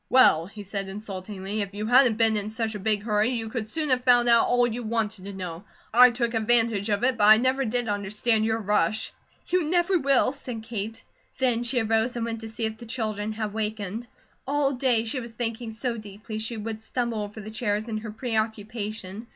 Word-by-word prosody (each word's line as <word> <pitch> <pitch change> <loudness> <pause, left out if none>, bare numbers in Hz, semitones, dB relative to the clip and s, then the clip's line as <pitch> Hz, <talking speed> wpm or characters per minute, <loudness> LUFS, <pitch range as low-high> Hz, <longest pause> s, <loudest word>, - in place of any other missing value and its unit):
"Well," 170 -10 +5
he 205 +1 -10
said 195 0 -4
insultingly, 195 0 -5
"if 200 0 -5
you 210 +1 -3
hadn't 245 -1 +5
been 225 -1 +4
in 210 0 -2
such 220 0 -1
a 210 - -5
big 205 0 0
hurry, 210 +1 +2
you 230 -3 -3
could 220 -2 -4
soon 305 +3 -1
have 250 -1 +2
found 245 -1 +5
out 235 -1 +5
all 245 0 +3
you 240 +1 -3
wanted 220 -3 -2
to 200 - -6
know. 180 -2 -6 0.3
I 250 +2 +9
took 240 -1 -1
advantage 225 -2 +2
of 205 +2 0
it, 250 -2 +2
but 205 - +5
I 215 +1 +9
never 260 +3 +1
did 240 +1 -1
understand 210 +2 +1
your 220 0 +1
rush." 210 -1 0 0.4
"You 365 -1 +2
never 350 +3 +2
will," 275 -3 +3
said 250 -5 -7
Kate. 225 -1 -5 0.3
Then 245 -3 +2
she 245 +1 +1
arose 225 +2 +1
and 235 -1 -2
went 230 -1 -4
to 225 - -6
see 225 +1 -3
if 220 0 -4
the 235 - -10
children 215 -2 -2
had 215 -2 -4
wakened. 215 +1 -4 0.4
All 285 0 +1
day 250 -4 +2
she 230 +3 -3
was 235 -2 -8
thinking 230 0 -3
so 230 +2 -3
deeply 215 +1 -7
she 220 +1 -3
would 220 0 -5
stumble 235 -1 -2
over 210 +1 -7
the 215 +1 -8
chairs 215 -1 -1
in 215 -2 -3
her 215 0 -7
preoccupation. 220 -2 -3
220 Hz, 215 wpm, -26 LUFS, 210-240 Hz, 0.4 s, I